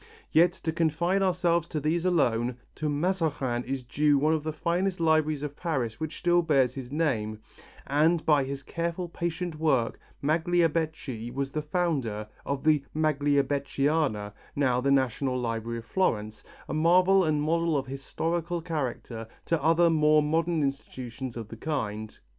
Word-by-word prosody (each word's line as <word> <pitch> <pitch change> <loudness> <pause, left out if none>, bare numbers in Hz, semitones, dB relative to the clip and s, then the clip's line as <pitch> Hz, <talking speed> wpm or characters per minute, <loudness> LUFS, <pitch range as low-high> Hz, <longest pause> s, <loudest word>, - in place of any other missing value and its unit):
Yet, 170 +2 +5
to 160 - 0
confine 170 +4 +1
ourselves 175 -3 +2
to 155 - -3
these 160 +4 0
alone, 125 -8 +1 0.2
to 155 0 -2
Mazarin 150 -6 0
is 135 0 -3
due 145 +4 +2
one 155 +3 +3
of 160 - 0
the 155 +1 -3
finest 180 +4 -1
libraries 155 -2 +2
of 145 -1 -4
Paris 130 -11 -2
which 155 0 -4
still 175 0 +3
bears 135 -7 +2
his 130 -2 -7
name, 120 -9 0 0.5
and 155 +4 +2
by 150 -3 +4
his 135 +1 -5
careful, 170 +4 -3
patient 170 -1 -4
work, 135 -8 +1 0.2
Magliabechi 160 -6 0
was 135 +1 -3
the 155 - -2
founder 150 - -1 0.2
of 140 -1 -2
the 155 -2 +3
Magliabechiana, 145 -5 +1 0.2
now 130 -3 +2
the 140 - +1
National 130 -1 +1
Library 115 -1 -3
of 115 - -8
Florence, 110 - -1 0.2
a - - -4
marvel 180 +4 +5
and 155 -3 +1
model 165 +1 +1
of 135 - -2
historical 165 +6 -3
character 130 -8 -4 0.2
to 165 -3 0
other 165 +2 +4
more 155 -1 +4
modern 165 +1 +1
institutions 130 -3 -5
of 115 -3 -6
the 115 - -9
kind. 110 -7 -3
150 Hz, 155 wpm, -28 LUFS, 130-165 Hz, 0.5 s, Yet